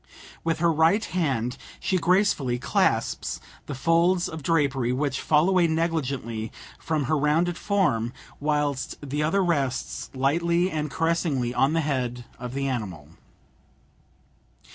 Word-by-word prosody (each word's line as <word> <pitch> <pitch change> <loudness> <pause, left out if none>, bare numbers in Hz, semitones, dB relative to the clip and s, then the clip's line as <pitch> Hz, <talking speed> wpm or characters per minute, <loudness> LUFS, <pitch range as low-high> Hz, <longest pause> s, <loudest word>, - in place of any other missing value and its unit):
With 165 -1 0
her 165 0 +2
right 165 +8 +3
hand 135 -8 -1 0.2
she 185 - 0
gracefully 170 -9 +2
clasps 135 +3 0 0.3
the 145 - -4
folds 170 +5 +3
of 160 -1 -7
drapery 135 -5 +1
which 135 +1 -1
fall 155 +2 +3
away 185 -3 +4
negligently 140 -9 -2 0.3
from 155 -3 -1
her 150 +4 +1
rounded 155 +4 +2
form, 150 - +1 0.3
whilst 145 -2 -1
the 145 +3 -1
other 190 +6 +2
rests 140 -8 -1
lightly 170 +7 +2
and 150 -1 -2
caressingly 160 -6 0
on 135 +4 +2
the 165 - +2
head 125 -5 -2
of 125 +1 -6
the 135 0 -1
animal. 95 - -4
150 Hz, 130 wpm, -25 LUFS, 130-170 Hz, 0.3 s, away